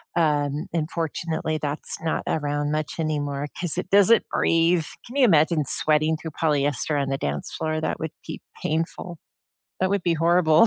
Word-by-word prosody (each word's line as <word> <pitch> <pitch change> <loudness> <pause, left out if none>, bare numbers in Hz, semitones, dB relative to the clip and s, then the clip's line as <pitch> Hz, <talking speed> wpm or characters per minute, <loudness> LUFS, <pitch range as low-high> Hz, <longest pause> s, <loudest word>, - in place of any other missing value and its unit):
Um, 150 -3 +1
unfortunately, 160 -1 -2
that's 145 0 -2
not 165 -1 -1
around 145 -1 -1
much 155 -1 -2
anymore 145 -2 -2
'cause 175 -2 -1
it 180 - -3
doesn't 205 +3 +5
breathe. 165 0 +2 0.2
Can 245 - -11
you 275 -2 +5
imagine 160 -5 +3
sweating 155 +2 +2
through 160 0 -7
polyester 145 -1 0
on 140 -1 -1
the 135 0 -2
dance 70 0 -3
floor? 155 0 -2
That - - -2
would 160 -1 -4
be - - -6 0.2
painful. 165 +2 -3 0.6
That 185 0 +2
would 200 -2 0
be 170 -2 +2
horrible. 165 +2 +4
160 Hz, 165 wpm, -24 LUFS, 150-170 Hz, 0.6 s, doesn't